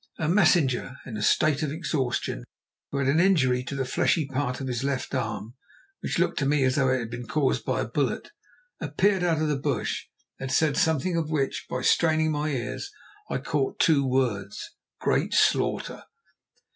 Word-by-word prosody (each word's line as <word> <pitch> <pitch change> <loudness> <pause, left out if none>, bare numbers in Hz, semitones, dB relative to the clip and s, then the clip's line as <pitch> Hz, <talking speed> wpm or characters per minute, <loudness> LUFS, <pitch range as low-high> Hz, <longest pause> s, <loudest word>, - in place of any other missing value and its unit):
A 160 - -1
messenger 155 -8 +3
in 120 - -7
a 105 - -4
state 150 +6 +3
of 150 -2 -1
exhaustion, 135 - -2 0.5
who 140 - -3
had 140 -1 0
an 145 +4 +3
injury 135 -10 +3
to 140 - -5
the 135 -1 -1
fleshy 150 +4 +1
part 130 -1 -2
of 135 - -4
his 125 -1 -2
left 135 -2 -2
arm, 115 +3 -3 0.5
which - - -3
looked - - +1
to 135 - +1
me 145 -1 +2
as 130 0 +2
though 135 -2 +3
it 130 - +3
had 115 -2 -5
been 120 0 -6
caused 150 -4 +1
by - - 0
a - - -2
bullet, - - -2 0.5
appeared 195 -1 +1
out 165 -3 +1
of - - +1
the 150 - +1
bush 140 -2 -2 0.3
and 135 -1 -4
said 155 -3 +2
something 160 -1 +1
of 160 -2 -1
which, 140 -4 -1
by 130 0 -3
straining 155 0 +3
my 150 0 -1
ears, 135 - -3 0.4
I - - -1
caught 400 - -1
two 150 -4 +4
words—"Great 120 -7 -2
slaughter." - - +1
140 Hz, 185 wpm, -26 LUFS, 130-155 Hz, 0.5 s, two